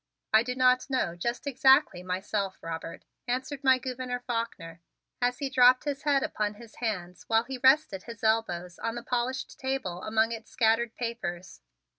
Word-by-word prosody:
"I 220 - +7
do 250 +2 -3
not 255 +1 +3
know 225 -10 0
just 235 +10 -3
exactly 265 - +4
myself, 190 +1 -2
Robert," 165 0 -6 0.2
answered 260 +3 -3
my 260 -1 +6
Gouverneur 250 0 -4
Faulkner 195 -9 -4 0.4
as 245 0 +1
he 280 - -2
dropped 255 -1 +5
his 285 -1 -3
head 285 -2 +2
upon 210 -1 -2
his 225 0 -14
hands 180 -7 -4
while 225 0 +3
he 260 +1 -6
rested 265 -7 +4
his 230 -1 -10
elbows 180 -6 0
on 230 0 -3
the 240 - -6
polished 250 +2 -2
table 260 -10 -3
among 220 +1 +1
its 225 -1 -7
scattered 230 0 +2
papers. 190 - -5
235 Hz, 165 wpm, -28 LUFS, 205-255 Hz, 0.4 s, I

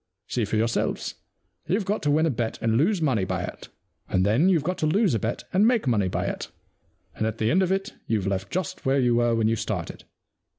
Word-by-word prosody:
See 120 -3 -1
for 105 - -2
yourselves. 115 +1 0 0.5
YouVe 195 +2 0
got 205 +3 -1
to 145 - 0
win 155 +2 +3
a 160 - +2
bet 115 -2 -2
and 115 0 +1
lose 170 - +2
money 125 -10 +2
by - - -2
it, - - -8 0.4
and 95 0 +2
then 120 - +3
youVe 170 -6 +3
got 180 +4 -2
to 155 - +1
lose 195 - +2
a 115 - +1
bet 115 +4 -3
and 200 +4 +5
make 235 -8 +2
money 105 -6 +2
by - - -2
it, - - -3 0.7
and 110 - -1
at 110 0 -3
the 110 0 +1
end 185 - +4
of 185 -1 +1
it 195 +2 -1
youVe 105 -4 0
left 95 -1 -2
just 180 -3 -3
where 135 +1 +2
you 125 -2 +3
were 120 0 +2
when 110 -1 +2
you 115 - +2
started. - - -4
125 Hz, 240 wpm, -25 LUFS, 110-180 Hz, 0.7 s, and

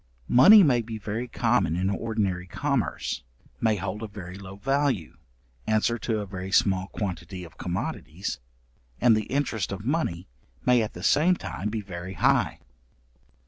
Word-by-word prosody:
Money 195 - +8
may 125 -7 +4
be 110 0 -6
very 110 +4 -4
common 80 - +1
in 95 +2 0
ordinary 100 -3 -1
commerce, 140 - -1 0.4
may 110 -2 +2
hold 100 +2 -4
a 110 - -4
very 95 -3 -9
low 95 -1 -9
value, 135 - 0 0.5
answer 110 +2 +2
to 110 -2 -1
a 105 - -3
very 95 -1 -6
small 95 -1 +3
quantity 90 -3 -5
of 85 - -13
commodities, 90 - -4 0.6
and 120 -2 +5
the 110 -1 -1
interest 130 -8 -1
of 100 +2 -6
money 125 - -1 0.4
may 125 -1 +5
at 110 - -3
the - - -9
same 175 +5 +4
time 105 - -4
be 110 0 -3
very 95 -1 -7
high. - - +2
105 Hz, 155 wpm, -26 LUFS, 95-120 Hz, 0.6 s, Money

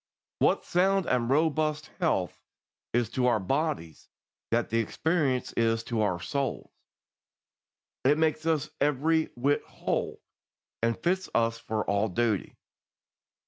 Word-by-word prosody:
What - - +2
sound 190 +1 +2
and 120 -2 +1
robust 155 0 +1
health - - 0 0.5
is 120 -1 +1
to 125 0 +1
our 120 -3 +3
bodies, 135 - -2 0.4
that 115 -1 0
the 115 - +2
experience 140 +1 0
is 115 -1 +1
to 115 -1 -1
our 95 -5 +1
souls. 135 +8 -3 1.3
It 145 +3 +4
makes 160 0 +1
us 155 -2 0
every 155 +3 +2
whit 140 +4 +1
whole, - - -3 0.6
and 115 0 +1
fits 185 +8 0
us 115 0 +2
for 110 -1 -2
all 100 +2 +2
duty. 110 0 -1
130 Hz, 125 wpm, -28 LUFS, 115-155 Hz, 1.3 s, It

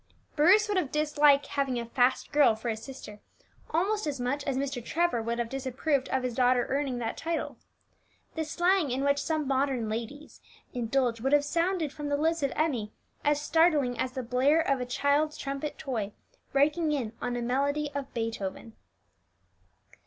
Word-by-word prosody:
Bruce 375 +8 +5
would 410 -2 0
have 305 -7 0
disliked 295 -2 +4
having 275 -4 -1
"a 235 - -4
fast 245 +2 +1
girl" 290 -6 +5
for 220 +2 -4
his 220 -1 -3
sister 225 -5 -10 0.5
almost 395 +4 0
as 285 -3 -3
much 265 +4 -1
as 275 -2 -1
Mr. 275 -3 -3
Trevor 335 -4 0
would 230 +1 -2
have 235 -1 -1
disapproved 270 +2 -1
of 265 -1 0
his 250 -1 -2
daughter 250 0 +3
earning 275 -2 -1
that 230 -2 -3
title. 330 0 -3 0.8
The 320 - -2
slang 350 +1 +1
in 260 +2 -1
which 280 0 +2
some 310 -2 -1
modern 265 -4 0
ladies 235 +7 -6 0.2
(?) - - -32
indulge 240 -1 0
would 270 +3 0
have 290 0 +4
sounded 335 -1 0
from 295 -1 -5
the 285 - +1
lips 325 +2 +1
of 275 - 0
Emmie 250 -10 -1 0.3
as 295 0 +2
startling 300 -4 +3
as 255 - -1
the 260 - -4
blare 260 +7 +3
of 275 -5 0
a 250 - -3
child's 290 +4 +1
trumpet 275 +2 -4
toy 220 -7 -3 0.4
breaking 300 +3 +2
in 245 -7 -2
on 245 0 -2
a 245 - -2
melody 285 +4 0
of 280 -1 -5
Beethoven. 225 -1 -4
275 Hz, 180 wpm, -28 LUFS, 245-300 Hz, 0.8 s, Bruce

